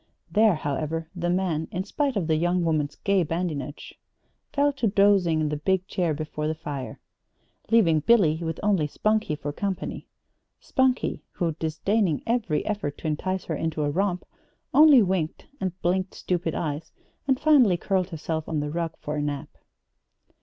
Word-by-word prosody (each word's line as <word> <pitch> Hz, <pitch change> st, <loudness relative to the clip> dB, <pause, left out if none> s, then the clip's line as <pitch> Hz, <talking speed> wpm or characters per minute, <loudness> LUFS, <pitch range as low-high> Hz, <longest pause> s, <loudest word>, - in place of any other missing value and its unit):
There, 215 Hz, -2 st, +4 dB
however, 155 Hz, +2 st, -3 dB
the 175 Hz, -1 st, -1 dB
man, 175 Hz, -3 st, 0 dB
in 185 Hz, -, -3 dB
spite 275 Hz, +6 st, -1 dB
of 195 Hz, -5 st, 0 dB
the 160 Hz, 0 st, +2 dB
young 175 Hz, +2 st, +1 dB
woman's 150 Hz, -3 st, 0 dB
gay 195 Hz, -1 st, +1 dB
badinage, 160 Hz, -3 st, -3 dB, 0.6 s
fell 285 Hz, 0 st, +2 dB
to 255 Hz, -4 st, 0 dB
dozing 195 Hz, -5 st, +3 dB
in 155 Hz, -, 0 dB
the 150 Hz, -, -2 dB
big 190 Hz, +4 st, 0 dB
chair 175 Hz, -7 st, 0 dB
before 150 Hz, 0 st, -4 dB
the 160 Hz, -, -1 dB
fire, 145 Hz, -4 st, -6 dB, 0.7 s
leaving 190 Hz, -9 st, +4 dB
Billy 165 Hz, -3 st, +4 dB
with 165 Hz, -1 st, -3 dB
only 195 Hz, -7 st, +2 dB
Spunkie 215 Hz, -1 st, 0 dB
for 145 Hz, 0 st, -5 dB
company 195 Hz, +2 st, -4 dB, 0.5 s
Spunkie, 260 Hz, -1 st, 0 dB
who, 170 Hz, -3 st, 0 dB
disdaining 165 Hz, +2 st, 0 dB
every 225 Hz, -10 st, 0 dB
effort 200 Hz, -9 st, -3 dB
to -, -, -13 dB
entice 185 Hz, +5 st, -2 dB
her 160 Hz, -, -2 dB
into 160 Hz, 0 st, -2 dB
a 145 Hz, -, 0 dB
romp, 180 Hz, +2 st, -1 dB, 0.5 s
only 295 Hz, -6 st, +8 dB
winked 180 Hz, -5 st, -2 dB
and 185 Hz, -2 st, -3 dB
blinked 185 Hz, +2 st, 0 dB
stupid 175 Hz, -3 st, -2 dB
eyes, 150 Hz, -1 st, -3 dB, 0.4 s
and 265 Hz, -1 st, +2 dB
finally 265 Hz, -, +5 dB
curled 190 Hz, +1 st, 0 dB
herself 160 Hz, -1 st, -4 dB
on 160 Hz, -2 st, 0 dB
the 145 Hz, 0 st, -3 dB
rug 165 Hz, 0 st, -2 dB
for 150 Hz, +1 st, -4 dB
a -, -, 0 dB
nap. 145 Hz, -1 st, -3 dB
175 Hz, 165 wpm, -26 LUFS, 155-200 Hz, 0.7 s, only